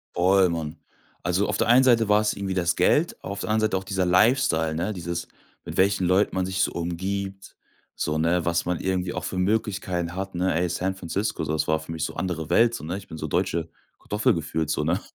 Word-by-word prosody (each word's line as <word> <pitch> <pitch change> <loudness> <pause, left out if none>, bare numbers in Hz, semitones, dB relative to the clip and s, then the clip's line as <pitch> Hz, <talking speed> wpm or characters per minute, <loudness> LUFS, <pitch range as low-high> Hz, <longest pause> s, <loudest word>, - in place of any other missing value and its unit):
Voll, 95 +1 +4
Mann. 80 -1 -4 0.5
Also, 90 +3 +1
auf - - -1
der - - +1
einen 125 +2 +7
Seite 115 -4 +4
war's 105 0 +3
irgendwie 95 -1 -3
das 85 -2 +1
Geld, 150 - +2
auf 100 +1 -5
der - - -4
anderen 110 0 +2
Seite - - +1
auch 95 - -5
dieser 95 -2 -1
Lifestyle, 90 - +3
ne? 90 +6 -1
Dieses 85 -1 -4 0.4
mit - - -7
welchen 95 -1 +3
Leuten 95 +2 +2
man 95 -1 0
sich 95 0 -1
so - - +2
umgibt, 95 +3 -4 0.4
so, 75 0 -1
ne, 85 +2 +1
was 85 0 +1
man 90 -1 -1
irgendwie 95 -1 -1
auch 90 - -4
für 95 - -4
Möglichkeiten 95 -3 -1
hat, 95 -1 -5
ne? 90 0 +1
Ey, 90 +2 0
San 95 +3 -2
Francisco, 95 +4 -2
das 75 0 -1
war 80 0 +2
für 80 - -9
mich 80 - -3
so - - -3
andere 85 -5 -3
Welt, 115 +1 +4
so, - - -7
ne? 85 +5 -3
Ich 100 - -11
bin 80 - -8
so - - -4
deutsche 85 -1 -1 0.3
Kartoffel 105 +1 +1
gefühlt, 80 -1 -2
so, 75 - 0
ne? 85 +5 +1
90 Hz, 225 wpm, -25 LUFS, 85-100 Hz, 0.5 s, einen